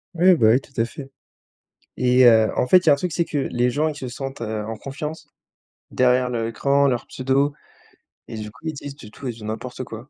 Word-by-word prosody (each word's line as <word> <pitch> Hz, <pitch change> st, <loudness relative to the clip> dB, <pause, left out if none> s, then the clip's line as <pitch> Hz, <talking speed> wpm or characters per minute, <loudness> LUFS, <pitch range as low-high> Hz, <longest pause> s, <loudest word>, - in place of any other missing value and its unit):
Oui, 180 Hz, +2 st, +5 dB
bah 115 Hz, -9 st, +3 dB
oui, 125 Hz, -, +4 dB
tout 135 Hz, -, -21 dB
à 115 Hz, -, +2 dB
fait, 135 Hz, +3 st, -8 dB, 0.9 s
et 125 Hz, 0 st, +4 dB
heu, 110 Hz, -2 st, +6 dB
en -, -, +1 dB
fait, 185 Hz, -, +7 dB
il 180 Hz, -, -11 dB
y -, -, +8 dB
a -, -, +8 dB
un -, -, +4 dB
truc, 175 Hz, +2 st, -3 dB
c'est 170 Hz, -, +1 dB
que 150 Hz, -, -4 dB
les 125 Hz, -2 st, 0 dB
gens, 150 Hz, +5 st, 0 dB
ils 155 Hz, -, -3 dB
se 130 Hz, -3 st, -6 dB
sentent, 135 Hz, +1 st, -7 dB
heu, 110 Hz, -2 st, -3 dB
en 110 Hz, +1 st, -5 dB
confiance, 150 Hz, +6 st, -7 dB, 0.6 s
derrière 125 Hz, 0 st, +3 dB
leur 120 Hz, -2 st, -2 dB
écran, 140 Hz, +4 st, +2 dB
leur 125 Hz, -3 st, -1 dB
pseudo 135 Hz, +2 st, 0 dB, 0.8 s
et 115 Hz, -, -8 dB
du 105 Hz, -1 st, -6 dB
coup, 125 Hz, +8 st, -11 dB
ils 160 Hz, -, -2 dB
disent 140 Hz, -1 st, -8 dB
du 105 Hz, -6 st, -12 dB
tout 135 Hz, -, -8 dB
et -, -, -1 dB
du 110 Hz, -2 st, -11 dB
n'importe 120 Hz, +4 st, -5 dB
quoi. 115 Hz, +4 st, -10 dB
130 Hz, 245 wpm, -22 LUFS, 115-145 Hz, 0.9 s, y